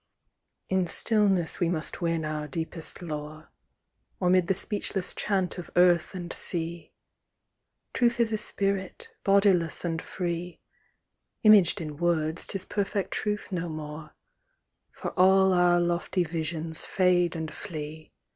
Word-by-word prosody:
In 190 -1 +1
stillness 195 -3 +1
we 175 -3 +1
must 165 0 -3
win 165 -2 0
our 155 -1 -3
deepest 160 +3 -5
lore. 155 -1 -7 0.7
Or 180 -1 +2
'mid 185 -2 +3
the 195 - +2
speechless 195 -1 -1
chant 190 -3 -1
of 175 - -8
earth 175 0 +4
and 175 -2 -5
sea: 170 -1 -4 1.0
Truth 240 -1 +2
is 225 -1 +2
a - - +1
spirit, 200 - 0
bodiless 195 -5 +3
and 165 -1 -2
free; 175 -1 -4 0.8
Imaged 210 -3 +6
in 150 -2 -6
words, 165 -1 0
'tis 195 - -2
perfect 200 -1 -2
truth 210 -1 -2
no 175 -2 -2
more, 155 0 -8 0.8
For - - -6
all 190 +1 +5
our 175 -1 +4
lofty 175 +1 0
visions 160 -1 -3
fade 180 -2 +2
and 160 -1 -4
flee. 155 -3 -7
175 Hz, 130 wpm, -27 LUFS, 160-190 Hz, 1.0 s, Imaged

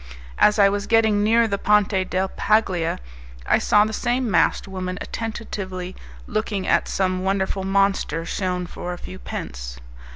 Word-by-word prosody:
As 210 - +5
I 200 -1 +6
was 200 0 -1
getting 220 -2 +3
near 230 +2 +4
the 200 -2 -2
Ponte 200 -2 +2
del 185 +1 0
Paglia 190 -7 +1 0.5
I - - +3
saw 210 0 +4
the 220 - -4
same 245 0 0
masked 175 +2 +2
woman 185 -1 -4
attentively 190 -5 -5 0.3
looking 210 -2 -2
at - - +2
some 185 -1 0
wonderful 190 0 0
monster 195 -3 +1
shewn 180 0 -2
for 175 0 -6
a - - -7
few 185 +1 -9
pence. - - -6
195 Hz, 155 wpm, -23 LUFS, 185-210 Hz, 0.5 s, I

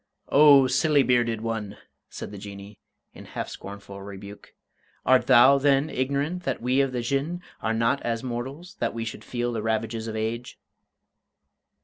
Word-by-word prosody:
"O, 140 -2 +7
silly 140 +2 +3
bearded 120 -3 +1
one!" 110 -3 -4 0.3
said - - -8
the 100 - -8
Jinnee, 100 0 -10 0.3
in - - -12
half - - -5
scornful 100 0 -9
rebuke; 100 +1 -11 0.5
"art 130 0 +4
thou, 130 +2 +7
then, 140 +2 +2
ignorant 140 +7 -1
that 135 -7 -2
we 125 +3 +2
of 135 -1 0
the 125 -1 -2
Jinn 140 +8 -1 0.2
are 110 - -1
not 115 +4 +1
as 115 0 -2
mortals, 135 - -6
that - - -1
we 115 0 -3
should 115 - -7
feel 120 -1 -3
the 110 - -2
ravages 110 +1 -2
of 110 - -5
age?" 115 +2 -4
120 Hz, 160 wpm, -25 LUFS, 110-135 Hz, 0.5 s, O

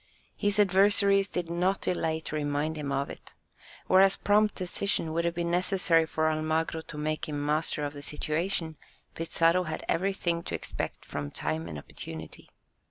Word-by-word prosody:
His 205 0 0
adversaries 200 0 +4
did 175 -2 -3
not 180 +3 +1
delay 160 -3 0
to 155 - -5
remind 145 +1 -1
him 145 -2 -4
of 140 +1 -1
it. - - -12 0.5
Whereas 190 +1 +5
prompt 210 0 +3
decision 180 -2 -1
would 170 +1 0
have 170 0 0
been 170 0 -1
necessary 175 -2 +3
for 155 0 0
Almagro 155 +1 0
to 160 - -9
make 155 +1 -2
him 145 -1 -3
master 150 0 0
of 145 - -4
the 145 - -8
situation, 160 +3 -1 0.4
Pizarro 165 +2 +2
had 155 - -5
everything 175 -2 0
to - - -3
expect - - -5
from 75 -1 -4
time 80 +3 -3
and 75 -3 -6
opportunity. 80 +2 -9
165 Hz, 165 wpm, -29 LUFS, 150-185 Hz, 0.5 s, Whereas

